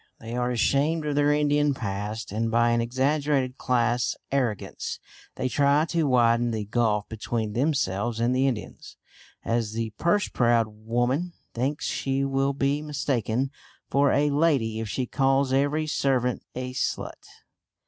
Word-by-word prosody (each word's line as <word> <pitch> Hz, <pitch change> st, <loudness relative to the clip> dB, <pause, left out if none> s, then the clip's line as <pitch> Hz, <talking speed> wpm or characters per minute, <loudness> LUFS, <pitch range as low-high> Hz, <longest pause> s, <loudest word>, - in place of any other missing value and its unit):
They 115 Hz, +1 st, -6 dB
are 125 Hz, 0 st, 0 dB
ashamed 140 Hz, +6 st, +1 dB
of 150 Hz, -, -1 dB
their 145 Hz, 0 st, +3 dB
Indian 145 Hz, -1 st, +2 dB
past, 105 Hz, -1 st, -4 dB
and 115 Hz, +2 st, -1 dB
by 120 Hz, +1 st, +3 dB
an 115 Hz, 0 st, +2 dB
exaggerated 135 Hz, +1 st, 0 dB
class 120 Hz, -1 st, +1 dB, 0.2 s
arrogance 125 Hz, -7 st, -2 dB, 0.4 s
they 130 Hz, -, -1 dB
try 140 Hz, +3 st, +3 dB
to 165 Hz, -3 st, +1 dB
widen 120 Hz, -2 st, +3 dB
the 110 Hz, -2 st, -3 dB
gulf 105 Hz, -1 st, 0 dB
between 110 Hz, 0 st, -3 dB
themselves 120 Hz, -5 st, 0 dB
and 120 Hz, +2 st, +2 dB
the 130 Hz, +1 st, +3 dB
Indians, 120 Hz, -5 st, -5 dB, 0.5 s
as 115 Hz, -2 st, 0 dB
the 115 Hz, -1 st, -2 dB
purse 205 Hz, +5 st, +2 dB
proud 120 Hz, -2 st, +2 dB
woman 120 Hz, +10 st, -1 dB, 0.2 s
thinks 135 Hz, +5 st, -2 dB
she 135 Hz, 0 st, -1 dB
will 135 Hz, 0 st, +1 dB
be 140 Hz, +1 st, 0 dB
mistaken 135 Hz, -4 st, -1 dB, 0.4 s
for 140 Hz, 0 st, +4 dB
a 145 Hz, +1 st, +2 dB
lady 140 Hz, -8 st, +1 dB
if 110 Hz, -1 st, -4 dB
she 130 Hz, +4 st, -1 dB
calls 135 Hz, 0 st, +1 dB
every 145 Hz, +3 st, +1 dB
servant 130 Hz, -4 st, 0 dB
a 125 Hz, 0 st, -4 dB
"slut." 125 Hz, -, -3 dB
130 Hz, 150 wpm, -26 LUFS, 115-140 Hz, 0.5 s, for